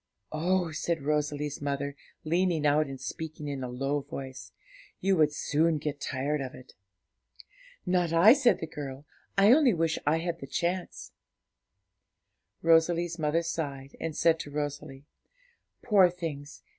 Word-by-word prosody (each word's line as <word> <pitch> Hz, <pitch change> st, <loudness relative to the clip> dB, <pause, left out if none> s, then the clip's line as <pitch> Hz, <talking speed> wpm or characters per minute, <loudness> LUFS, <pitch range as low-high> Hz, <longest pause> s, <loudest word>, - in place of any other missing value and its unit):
'Oh,' 175 Hz, +2 st, 0 dB
said 160 Hz, -1 st, -2 dB
Rosalie's 150 Hz, -1 st, -1 dB
mother, 140 Hz, 0 st, -2 dB, 0.3 s
leaning 170 Hz, -1 st, +1 dB
out 150 Hz, +1 st, +3 dB
and 135 Hz, -1 st, -7 dB
speaking 155 Hz, +3 st, -6 dB
in 140 Hz, -2 st, -4 dB
a 125 Hz, -, -4 dB
low 135 Hz, +4 st, -1 dB
voice, 130 Hz, -7 st, -8 dB, 0.5 s
'you 195 Hz, +1 st, +2 dB
would 155 Hz, -3 st, +4 dB
soon 155 Hz, +2 st, +1 dB
get 145 Hz, -1 st, -4 dB
tired 140 Hz, +2 st, -2 dB
of 130 Hz, -1 st, -6 dB
it.' 130 Hz, -, -14 dB, 1.1 s
'Not 180 Hz, -2 st, +1 dB
I,' 170 Hz, +8 st, +8 dB
said 265 Hz, -3 st, +3 dB
the -, -, -1 dB
girl; 145 Hz, -2 st, -7 dB, 0.3 s
'I 200 Hz, +3 st, +6 dB
only 265 Hz, -, +5 dB
wish 165 Hz, -1 st, 0 dB
I 155 Hz, +2 st, +4 dB
had 170 Hz, +1 st, -3 dB
the 135 Hz, -, -8 dB
chance.' 175 Hz, +5 st, -3 dB, 1.5 s
Rosalie's 165 Hz, +1 st, +3 dB
mother 155 Hz, +2 st, +1 dB
sighed, 140 Hz, -5 st, -4 dB
and 165 Hz, -2 st, -4 dB
said 165 Hz, -1 st, +3 dB
to 145 Hz, -, -6 dB
Rosalie, 145 Hz, -1 st, -5 dB, 0.8 s
'Poor 195 Hz, -5 st, +5 dB
things! 155 Hz, -5 st, -7 dB
155 Hz, 145 wpm, -29 LUFS, 145-170 Hz, 1.5 s, I